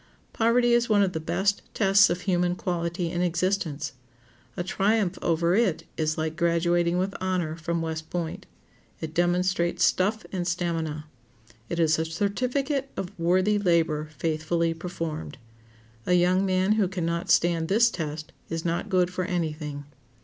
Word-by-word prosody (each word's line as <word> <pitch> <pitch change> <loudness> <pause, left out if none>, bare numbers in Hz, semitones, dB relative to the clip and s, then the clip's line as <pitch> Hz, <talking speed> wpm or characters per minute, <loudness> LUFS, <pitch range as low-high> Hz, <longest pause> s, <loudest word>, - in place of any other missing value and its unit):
Poverty 240 +1 +3
is 235 0 +2
one 205 -2 +5
of 185 -2 0
the 160 - -2
best 195 +5 0
tests 200 -1 +5
of 175 +1 -2
human 180 -2 +1
quality 170 -1 -2
in 175 - -1
existence. 170 -4 -1 0.6
A 175 - -1
triumph 195 0 +1
over 170 +1 +1
it 195 -5 +2
is 155 -1 -1
like 160 0 -2
graduating 170 0 +2
with 190 +2 -1
honor 180 -4 -1
from 165 0 -2
West 160 -1 -4
Point. 170 -2 -4 0.5
It 160 -1 -6
demonstrates 175 0 +1
stuff 210 +4 +2
and 180 -2 -2
stamina. 165 -3 -2 0.6
It 170 - -2
is 160 -1 +3
a 160 - 0
certificate 250 - -1
of 185 0 -4
worthy 185 +5 +2
labor 165 -5 +1
faithfully 165 +2 0
performed. 165 -3 -5 0.7
A 180 - +3
young 180 +2 +3
man 185 +1 +2
who 215 -3 +3
can 180 -2 -3
not 170 0 -2
stand 165 -1 +3
this 230 +5 +4
test 155 -3 -5 0.2
is 165 0 -4
not 170 0 -1
good 180 -1 +2
for 185 0 -2
any 170 -4 -1
thing. 150 -2 -7
175 Hz, 155 wpm, -26 LUFS, 165-190 Hz, 0.7 s, one